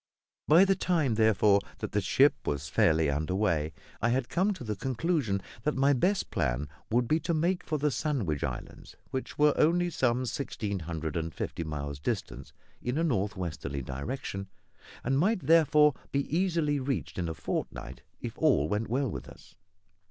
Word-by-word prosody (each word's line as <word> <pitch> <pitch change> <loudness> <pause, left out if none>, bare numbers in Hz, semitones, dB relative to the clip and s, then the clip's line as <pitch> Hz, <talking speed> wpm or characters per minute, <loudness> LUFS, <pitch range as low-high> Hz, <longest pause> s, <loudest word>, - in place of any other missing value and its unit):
By 170 +6 +7
the 195 - +4
time, 165 -9 +1
therefore, 105 -2 +4 0.2
that - - -5
the - - +1
ship - - +4
was 70 +1 -2
fairly 80 0 +3
under 75 +6 -1
way, 85 -7 +1 0.3
I 115 - +2
had 125 0 0
come 190 +4 +2
to 130 - -8
the 110 -2 -3
conclusion 130 - -1 0.2
that 150 +5 0
my 140 +1 +4
best 180 +10 +1
plan - - 0 0.2
would 120 +1 +2
be 155 +5 +2
to 170 0 -1
make 175 +4 +1
for 155 - -1
the 150 0 +1
Sandwich 110 - -1
Islands, - - -6 0.2
which 130 - -4
were 150 0 +5
only 175 +3 +3
some 130 -3 +1
sixteen 110 -5 -3
hundred 80 -2 -4
and 80 -1 -2
fifty 85 - -3
miles 70 -2 -5
distant, - - -4 0.3
in 125 +3 -2
a 165 - +1
north 105 - 0
westerly 70 -6 -4
direction, 100 - -5 0.6
and 135 +2 +1
might 195 +4 +2
therefore 150 -1 +5 0.2
be 140 - +1
easily 165 -5 +1
reached 130 - -3
in 85 -2 -1
a 80 - -4
fortnight, 65 -4 -4 0.2
if - - -6
all 70 - +3
went 105 +5 -1
well 135 +4 +1
with 105 - -6
us. - - -15
120 Hz, 175 wpm, -29 LUFS, -, 0.6 s, By